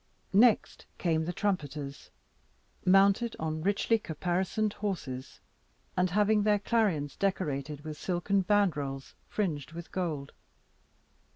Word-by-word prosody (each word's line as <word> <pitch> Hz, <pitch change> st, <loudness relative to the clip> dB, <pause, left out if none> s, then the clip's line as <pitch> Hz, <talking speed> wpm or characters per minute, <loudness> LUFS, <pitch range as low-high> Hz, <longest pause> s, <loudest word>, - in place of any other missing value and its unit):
Next 225 Hz, +3 st, +4 dB
came 160 Hz, -2 st, +1 dB
the 175 Hz, -, -2 dB
trumpeters, 150 Hz, -8 st, -3 dB, 0.7 s
mounted 195 Hz, +5 st, +4 dB
on 155 Hz, 0 st, -3 dB
richly 205 Hz, +5 st, +2 dB
caparisoned 185 Hz, +5 st, -1 dB
horses, 150 Hz, -11 st, -5 dB, 0.5 s
and 180 Hz, 0 st, +2 dB
having 210 Hz, +3 st, +3 dB
their 210 Hz, 0 st, +3 dB
clarions 195 Hz, -10 st, 0 dB
decorated 150 Hz, -7 st, -2 dB
with 155 Hz, 0 st, -7 dB
silken 190 Hz, +2 st, +1 dB
bandrols, 150 Hz, -10 st, 0 dB
fringed 160 Hz, -8 st, -2 dB
with 170 Hz, 0 st, -8 dB
gold. 155 Hz, -7 st, -3 dB
180 Hz, 105 wpm, -30 LUFS, 150-205 Hz, 0.7 s, Next